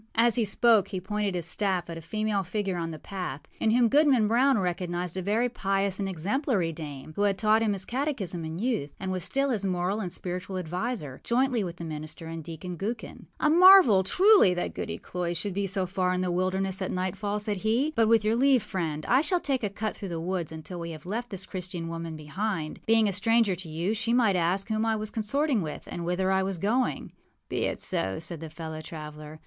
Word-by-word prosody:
â - - -28
As 230 +1 +4
he 230 -1 +2
spoke 215 0 +4
he 190 - -4
pointed 205 0 -2
his 175 -3 -2
staff 185 +1 +1
at 165 - -6
a 165 - -7
female 215 +4 -1
figure 195 0 -2
on 165 -1 -3
the 160 - -6
path, 180 -7 -5 0.2
in 220 - +2
whom 240 +1 +4
Goodman 275 -4 +4
Brown 255 +4 +4
recognized 180 -2 -2
a 190 - -2
very 215 +6 +1
pious 195 -4 0
and 195 -1 -1
exemplary 190 - 0
dame, 150 -2 -8
who - - -2
had 200 -1 +2
taught 215 +2 +3
him 215 -2 +2
his 190 -1 -5
catechism 235 - -2
in 160 +1 -5
youth, 220 - -1
and 190 -1 -3
was 185 -2 -2
still 275 +7 +1
his 215 -5 -1
moral 185 +2 0
and 185 -5 -3
spiritual 185 +1 -5
adviser, 180 - -4
jointly 245 -2 +1
with 175 -2 -5
the 170 - -8
minister 155 +1 -6
and 165 0 -6
Deacon 170 +3 -7
Gookin. 220 +3 -5
âA 300 - +3
marvel, 365 - +8
truly, 375 - +5
that 175 - -2
Goody - - -4
Cloyse 175 -1 -3
should 200 +3 -2
be 200 +1 -1
so 190 -1 -1
far 185 0 0
in 180 - -1
the 180 -1 0
wilderness 185 +1 0
at 185 - -1
nightfall,â 200 +3 -2
said 210 -1 -2
he. 230 +9 +1
âBut 230 -7 +2
with 225 -1 +4
your 220 +1 +3
leave, 260 -1 +4
friend, 160 -6 -3
I 260 +3 +4
shall 360 +3 +1
take 275 -6 0
a 210 - 0
cut 210 +2 -3
through 195 - -6
the 170 -1 -3
woods 175 -1 -3
until 160 +3 -7
we 170 0 -5
have 155 -1 -9
left 235 +6 -3
this 190 -2 -6
Christian 180 -2 -5
woman 165 -1 -5
behind. 155 +2 -3
Being 225 -1 +4
a 200 - 0
stranger 225 +1 +3
to 175 -2 -7
you, 170 +6 -1
she 230 +1 0
might 230 -6 +4
ask 180 +3 +1
whom 220 0 0
I 225 -1 +1
was 215 0 -4
consorting 250 +3 0
with 155 -3 -5
and 175 - -4
whither 180 +2 0
I 190 0 +3
was 190 -1 -2
going.â 210 - 0 0.4
âBe - - -1
it - - -8
so,â 95 0 -1
said 165 0 -5
his 160 -1 -7
fellow 160 -1 -6
traveller. 155 -1 -9
190 Hz, 230 wpm, -27 LUFS, 170-220 Hz, 0.4 s, marvel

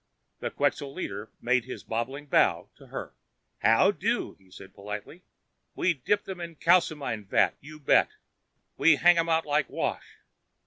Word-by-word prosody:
The - - -3
Quxa 140 -1 -1
leader 110 - -6
made 125 -1 +1
his 130 - -8
bobbing 130 +6 -4
bow 145 - +2
to - - -16
her. - - -7 0.5
"How - - +4
do," - - -2
he 95 -1 -24
said 95 +1 -13
politely. 105 - -8 0.5
"We 180 - +2
dip 205 +9 0
them 185 -2 -7
in 170 -1 -7
calcimine 150 - +1
vat, - - +2
you 155 +2 -12
bet. 145 - +4 0.7
We 165 -1 +6
hang 175 +4 +5
them 165 0 +1
out 160 0 +2
like 145 -1 0
wash. - - -4
145 Hz, 160 wpm, -27 LUFS, 115-165 Hz, 0.7 s, We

